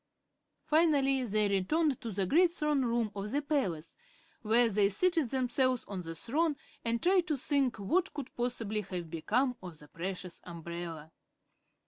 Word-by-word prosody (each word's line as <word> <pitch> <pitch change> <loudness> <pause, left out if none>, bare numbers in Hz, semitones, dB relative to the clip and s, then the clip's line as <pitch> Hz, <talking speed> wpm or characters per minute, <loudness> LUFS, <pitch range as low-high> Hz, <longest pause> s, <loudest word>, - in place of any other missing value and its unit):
Finally 285 -4 +3
they 215 -1 +1
returned 260 - +1
to 230 - -5
the 195 -1 -1
great 340 - +4
throne 300 -5 +1
room 235 -3 0
of 200 +1 -4
the 280 - 0
palace, 270 - -2 0.5
where 230 +2 +4
they 205 -2 +3
seated 330 - +1
themselves 255 0 +1
on 195 -3 -4
the 165 -1 -6
throne 300 - 0 0.3
and 230 0 -1
tried 360 -1 +3
to 300 - 0
think 270 -2 +1
what 340 - 0
could 285 -4 -7
possibly 230 -3 -2
have 180 -4 -6
become 245 - 0
of 175 -4 -9
the 150 - -14
precious 180 +2 -6
umbrella. 170 -2 -7
235 Hz, 155 wpm, -31 LUFS, 190-285 Hz, 0.5 s, great